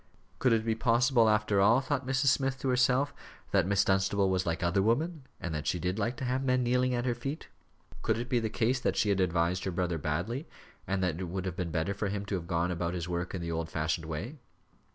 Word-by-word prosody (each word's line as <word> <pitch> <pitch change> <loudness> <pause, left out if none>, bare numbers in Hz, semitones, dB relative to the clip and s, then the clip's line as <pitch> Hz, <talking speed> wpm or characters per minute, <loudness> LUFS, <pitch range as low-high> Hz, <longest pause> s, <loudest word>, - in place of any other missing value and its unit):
Could 130 - +3
it 115 -1 +2
be 115 - +2
possible, 120 +1 +3
after 105 -2 +2
all, 115 +5 +5
thought 135 -1 -2
Mrs. 135 +1 +1
Smith 135 -1 +1
to 135 - 0
herself, 130 +2 +2 0.4
that 95 -3 +3
Miss 100 0 +3
Dunstable 95 0 +2
was 95 0 0
like 85 0 -1
other 85 +3 +2
women, 135 - 0
and 85 - -4
that 75 -1 -3
she - - +1
did 90 +4 -2
like 120 +3 -1
to 130 - -4
have 130 +2 0
men 130 -1 +2
kneeling 125 +1 +2
at 120 0 -1
her 125 - +1
feet? 135 +6 -6 0.5
Could 110 0 +1
it 120 +1 -3
be 125 -2 +2
the 110 -1 -2
case 120 +4 +1
that - - 0
she 105 - +2
had 100 -1 +2
advised 90 0 +1
her - - 0
brother 90 -2 -1
badly, 90 - -2 0.4
and 95 0 0
that 90 -2 0
it 95 - -3
would 90 +2 -4
have 90 -2 -3
been 90 -2 -3
better 80 +4 -1
for 100 +1 -2
him 100 0 -3
to 100 - -5
have 85 -3 -3
gone 85 0 0
about 85 0 -2
his 85 -1 -3
work 90 +1 -3
in 90 - -4
the 85 0 -3
old 80 0 -2
fashioned 80 +1 -2
way? 100 - -5
100 Hz, 250 wpm, -30 LUFS, 90-125 Hz, 0.5 s, all